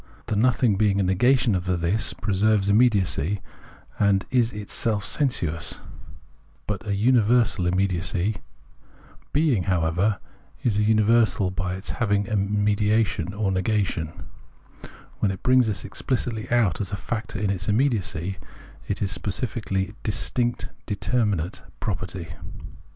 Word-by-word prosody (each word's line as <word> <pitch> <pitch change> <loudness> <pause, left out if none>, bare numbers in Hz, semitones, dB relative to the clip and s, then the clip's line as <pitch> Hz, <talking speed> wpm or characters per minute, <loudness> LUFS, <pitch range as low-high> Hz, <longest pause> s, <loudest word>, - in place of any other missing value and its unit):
The 110 - -2
nothing 115 -1 +3
being 100 -1 +2
a - - +3
negation 120 +6 +3
of 90 -1 -1
the 90 -1 0
This, 85 +6 0
preserves 100 +3 +1
immediacy 100 - +2 0.6
and 100 -2 +3
is 120 -2 +3
itself 105 0 -2
sensuous, 85 - -1 0.9
but 105 +1 -4
a 100 - 0
universal 115 -3 +3
immediacy. 95 +2 0 0.9
Being, 140 - +2
however, 90 +3 +1 0.5
is 105 -4 +2
a - - +3
miiversal 110 -3 +3
by 90 0 -2
its 95 +2 -6
having 100 -3 0
in 100 - -9
it - - -6
mediation 105 -3 +1
or 100 -2 0
negation. 95 -4 0 1.1
When 105 - +2
it 95 -1 -5
brings 125 -2 +4
this 105 -3 -3
exphcitly 110 +2 -3
out 110 -8 +2
as 95 -2 -4
a - - -1
factor 110 +2 -4
in 100 -1 0
its 95 +1 -3
immediacy, 100 - 0 0.5
it 100 - -2
is 100 - 0
a - - 0
specifically 100 0 -2
distinct 120 +2 -1 0.2
determinate 105 -5 -1 0.2
property. 95 -2 -3
100 Hz, 130 wpm, -24 LUFS, 95-110 Hz, 1.1 s, brings